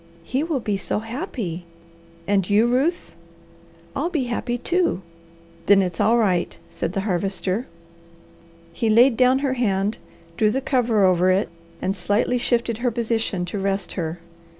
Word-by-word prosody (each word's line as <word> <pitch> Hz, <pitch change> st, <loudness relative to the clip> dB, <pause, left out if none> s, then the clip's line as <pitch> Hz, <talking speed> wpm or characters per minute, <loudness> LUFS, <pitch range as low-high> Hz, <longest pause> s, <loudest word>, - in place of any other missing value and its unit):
"He 260 Hz, +10 st, -1 dB
will 315 Hz, -3 st, -1 dB
be 210 Hz, -4 st, -1 dB
so -, -, -2 dB
happy!" 220 Hz, -, -5 dB, 0.6 s
"And 195 Hz, -2 st, +1 dB
you, 210 Hz, +3 st, +4 dB
Ruth?" 270 Hz, +9 st, 0 dB, 0.8 s
"I'll 340 Hz, -, -1 dB
be 310 Hz, -6 st, -1 dB
happy 240 Hz, 0 st, -2 dB
too!" 340 Hz, -, 0 dB, 0.6 s
"Then 195 Hz, -1 st, +6 dB
it's 175 Hz, -3 st, -4 dB
all 230 Hz, +2 st, +4 dB
right," 185 Hz, -6 st, +1 dB
said 175 Hz, -, -3 dB
the 195 Hz, -, -1 dB
Harvester. 195 Hz, +3 st, -1 dB, 1.1 s
He 225 Hz, +5 st, 0 dB
laid 235 Hz, +3 st, +6 dB
down 255 Hz, +2 st, +4 dB
her 265 Hz, -, +1 dB
hand, 210 Hz, -4 st, 0 dB, 0.4 s
drew 215 Hz, -, +3 dB
the 260 Hz, -, 0 dB
cover 240 Hz, -7 st, +2 dB
over 185 Hz, 0 st, +3 dB
it, 190 Hz, +3 st, +2 dB, 0.3 s
and 195 Hz, -, 0 dB
slightly 205 Hz, +6 st, 0 dB
shifted 235 Hz, -2 st, 0 dB
her 245 Hz, 0 st, +1 dB
position 225 Hz, -5 st, -1 dB
to 190 Hz, +3 st, -4 dB
rest 195 Hz, 0 st, -1 dB
her. 165 Hz, -2 st, -3 dB
220 Hz, 150 wpm, -23 LUFS, 195-245 Hz, 1.1 s, Then